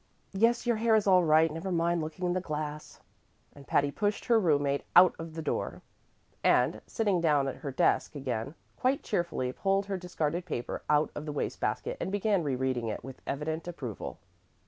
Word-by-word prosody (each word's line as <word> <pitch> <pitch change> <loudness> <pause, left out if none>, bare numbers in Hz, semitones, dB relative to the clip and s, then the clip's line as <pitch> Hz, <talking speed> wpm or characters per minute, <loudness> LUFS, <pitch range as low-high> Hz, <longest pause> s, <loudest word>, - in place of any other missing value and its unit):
Yes, 230 +5 +2
your 240 -2 +2
hair 225 0 +3
is 215 - +2
all 185 -2 +5
right; 160 0 +4
never 175 +4 -4
mind 170 0 +1
looking 160 +4 -4
in 175 - +1
the 185 - -1
glass." 150 -2 -5 0.5
And 140 -1 -14
Patty 145 0 +2
pushed 205 +6 -1
her 235 -2 +4
room 155 -7 +3
mate 140 0 0
out 180 +1 +8
of 165 -1 -7
the 160 - -4
door, - - -3 0.6
and, - - +3
sitting 205 -6 +1
down 145 -4 +3
at 135 - -4
her 145 - -5
desk 135 - +1
again, 130 0 -3 0.2
quite 260 +2 +1
cheerfully 170 -10 -1
pulled 195 +4 +1
her 195 -1 -3
discarded 175 -2 -2
paper 120 -7 -4
out 150 +1 +3
of 150 +1 -6
the - - -2
waste 145 - -3
basket - - -2
and - - -2
began 205 -1 +1
re 140 -5 -1
reading 125 -2 -1
it 105 - -4
with 135 +1 -10
evident 160 +4 -3
approval. 130 - -6
165 Hz, 195 wpm, -30 LUFS, 145-195 Hz, 0.6 s, out